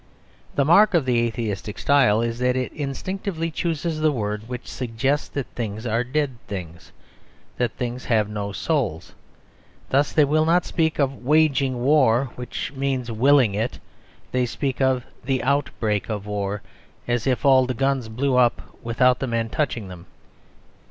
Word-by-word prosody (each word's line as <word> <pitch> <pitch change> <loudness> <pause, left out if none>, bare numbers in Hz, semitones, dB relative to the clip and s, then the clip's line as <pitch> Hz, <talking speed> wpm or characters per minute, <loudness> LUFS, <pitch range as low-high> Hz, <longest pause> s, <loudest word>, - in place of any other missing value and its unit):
The 140 - +2
mark 195 +6 +6
of 160 -6 +3
the 125 -2 +2
atheistic 110 -3 -3
style 130 -7 +3
is 115 0 -3
that 125 0 +1
it 130 -1 -2
instinctively 165 +4 -3
chooses 165 -1 -2
the 155 0 +3
word 105 -3 -3
which 125 -1 -6
suggests 130 +4 -1
that 140 -3 -4
things 110 -1 -4
are 115 +1 +1
dead 135 0 -1
things; 85 -4 -7 0.7
that 120 -3 0
things 125 0 -4
have 110 -3 +2
no 105 -1 -4
souls. 100 - -2 0.8
Thus 140 +2 +3
they 150 - +4
will 155 +2 +2
not 170 +2 +3
speak 160 -2 0
of 135 -3 -1
waging 140 -3 +2
war, 130 -3 +3
which 125 -1 -5
means 135 -3 -2
willing 125 -1 +4
it; 110 +4 -2 0.5
they 125 -1 +1
speak 135 +2 -3
of 130 -2 +2 0.2
the 130 0 -1
"outbreak 120 -7 0
of 105 -2 -3
war," 105 -1 -3 0.4
as 120 0 0
if 130 +2 0
all 130 -2 +5
the 130 - -2
guns 135 -2 0
blew 130 +3 0
up 120 -2 +1
without 125 +2 +2
the 135 - -2
men 115 -1 -1
touching 120 -7 -2
them. 90 0 -11
125 Hz, 160 wpm, -23 LUFS, 115-140 Hz, 0.8 s, mark